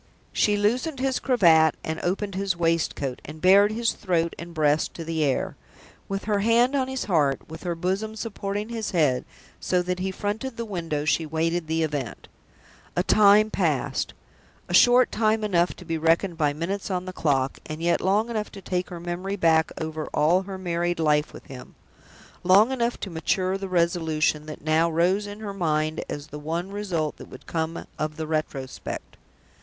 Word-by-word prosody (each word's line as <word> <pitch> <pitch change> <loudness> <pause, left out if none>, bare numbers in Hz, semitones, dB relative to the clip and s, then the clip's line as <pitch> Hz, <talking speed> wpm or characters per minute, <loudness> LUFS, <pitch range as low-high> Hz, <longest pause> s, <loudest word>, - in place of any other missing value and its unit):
She 210 -1 +2
loosened 250 +8 0
his 265 -1 0
cravat 165 - +4
and 160 0 -3
opened 195 +3 -2
his 190 -2 -1
waistcoat, 165 -6 0
and 155 +2 -9
bared 200 +4 +6
his 230 +1 +1
throat 170 -3 -1
and 170 0 -7
breast 155 -2 +1
to 165 - -6
the 160 -1 -1
air. 140 -3 0 0.5
With 195 0 -3
her 205 -1 0
hand 230 +5 +3
on 265 -2 +1
his 265 0 -3
heart, 150 -8 +1
with 160 +1 -9
her 175 -2 -2
bosom 190 +6 -2
supporting 205 -1 -4
his 225 -2 -3
head, 135 -6 +2 0.3
so 180 -1 +1
that 180 0 -2
he 190 +1 -1
fronted 210 +6 -4
the 230 - -3
window, 165 -7 -3
she 160 +1 +1
waited 165 +2 -1
the 160 +1 0
event. 145 -6 -4 0.7
A 175 - +2
time 210 +2 +5
passed: 155 -9 -1 0.5
a - - -5
time - - +5
short 245 +4 +6
enough 215 -5 +2
to 180 - -12
be 165 0 -2
reckoned 165 +3 +2
by 150 -3 +1
minutes 175 +8 -3
on 185 -1 -2
the 185 - -6
clock; 135 -5 0
and 155 0 -5
yet 170 +1 +1
long 210 +5 +1
enough 215 -2 -3
to 195 - -9
take 180 0 -2
her 175 -2 -7
memory 175 +3 -3
back 160 -4 +3
over 160 -1 -4
all 165 +5 +4
her 195 0 -7
married 175 -1 -1
life 150 -1 +2
with - - -12
him 130 -2 -11 0.7
long 200 +7 +5
enough 240 -2 -1
to 195 - -4
mature 185 +3 0
the 195 0 -5
resolution 160 -3 +1
that 155 - -8
now 160 +2 +3
rose 180 +5 +1
in 205 +1 -8
her 205 -2 -5
mind 155 -4 0
as 145 0 -5
the 150 -1 -9
one 165 +5 -3
result 180 -7 -2
that - - -11
could - - -12
come 160 0 -3
of 155 0 -2
the 160 - -3
retrospect. 155 -4 -4
175 Hz, 185 wpm, -25 LUFS, 160-205 Hz, 0.7 s, bared